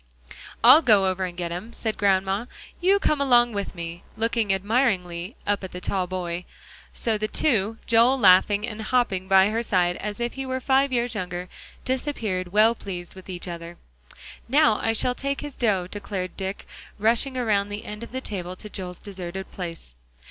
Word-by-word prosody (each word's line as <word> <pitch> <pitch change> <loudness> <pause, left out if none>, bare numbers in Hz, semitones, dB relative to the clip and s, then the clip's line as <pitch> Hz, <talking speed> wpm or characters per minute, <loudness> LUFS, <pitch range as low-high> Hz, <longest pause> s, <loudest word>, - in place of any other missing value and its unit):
"I'll 315 - +9
go 215 -9 +5
over 185 0 0
and 175 -1 -7
get 175 -1 -3
'em," 190 +7 -6
said 220 -2 -3
Grandma; 195 +2 +1 0.3
"you 380 +3 +4
come 305 -7 +1
along 240 -3 +4
with 200 -1 -4
me," 170 0 -6 0.2
looking 225 -2 0
admiringly 195 -3 0
up 205 -1 0
at 190 - -7
the 180 - -5
tall 185 0 -1
boy; 180 -1 -4 0.5
so 220 -2 -1
the 215 - -1
two, 225 -5 +1
Joel 235 +4 +5
laughing 200 0 +5
and 220 -2 -6
hopping 215 -5 0
by 190 +1 +5
her 225 +2 0
side 180 -5 +1
as 210 +1 -5
if 240 0 -2
he 270 - -5
were 260 0 -3
five 270 +1 +2
years 240 -1 0
younger, 180 -3 -4 0.4
disappeared, 225 -9 -2
well 215 +3 +5
pleased 180 -6 -7
with 190 0 -13
each 180 0 -5
other. 170 0 -7 0.7
"Now 285 -4 +4
I 225 - +2
shall 245 +3 +1
take 275 +2 -3
his 290 -1 -6
dough," 205 -8 +1
declared 195 -1 -5
Dick, 190 0 -5 0.3
rushing 235 +5 +2
around 205 -5 +1
the 205 +1 -6
end 210 +1 -7
of 235 - -8
the 260 +1 -4
table 185 -6 -4
to 210 +3 -10
Joel's 180 -2 -6
deserted 190 -2 -7
place. 165 - -7
205 Hz, 185 wpm, -25 LUFS, 185-235 Hz, 0.7 s, I'll